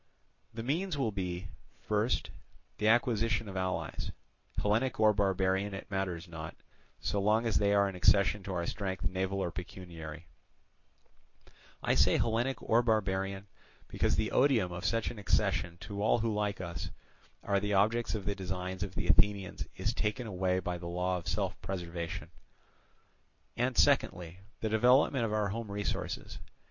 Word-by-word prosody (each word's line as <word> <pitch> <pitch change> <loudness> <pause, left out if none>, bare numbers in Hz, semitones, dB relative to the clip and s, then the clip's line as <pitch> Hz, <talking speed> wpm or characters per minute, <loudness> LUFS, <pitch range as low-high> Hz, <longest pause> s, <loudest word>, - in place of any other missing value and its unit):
The 115 0 -6
means 160 +6 -1
will 125 -6 +1
be, 90 -1 -4 0.3
first, 105 +3 0 0.5
the 105 - +2
acquisition 115 -2 +2
of 95 - -7
allies, 95 -5 -2 0.5
Hellenic 110 +5 +1
or 110 -1 +6
barbarian 95 0 +1
it 95 - -9
matters 90 -3 -2
not, 80 -2 -7 0.4
so 100 - -1
long 110 +3 +3
as 115 - +2
they 100 -1 +3
are 100 0 +4
an 95 - -4
accession 100 +3 +4
to 95 - -6
our 85 -1 -1
strength 95 -2 -3
naval 95 +1 -1
or 85 - -2
pecuniary—I 85 -3 -9
say - - +4
Hellenic 120 +2 0
or 115 +2 +4
barbarian, 100 -4 0 0.4
because - - +1
the 110 0 0
odium 125 -10 +3
of 90 +1 -5
such 115 -1 +1
an 115 - -9
accession 85 -3 +1
to 100 -1 -5
all 110 - +4
who 115 -1 0
like 105 -1 -1
us 85 -2 -4 0.5
are 100 -1 +2
the 105 0 0
objects 110 +4 +2
of 100 -3 -4
the 100 - 0
designs 95 -1 -4
of 100 -2 -4
the - - -2
Athenians 100 -2 +2
is - - 0
taken 120 +4 -1
away 95 -3 0
by 90 -1 -2
the 85 - -6
law 90 +1 0
of 85 - -11
self - - -1
preservation—and 85 -3 -7
secondly 90 0 +2 0.2
the 110 - 0
development 125 +3 +4
of 110 - -2
our 105 -1 +1
home 115 +1 -4
resources. 100 0 -3
100 Hz, 155 wpm, -32 LUFS, 90-110 Hz, 0.5 s, or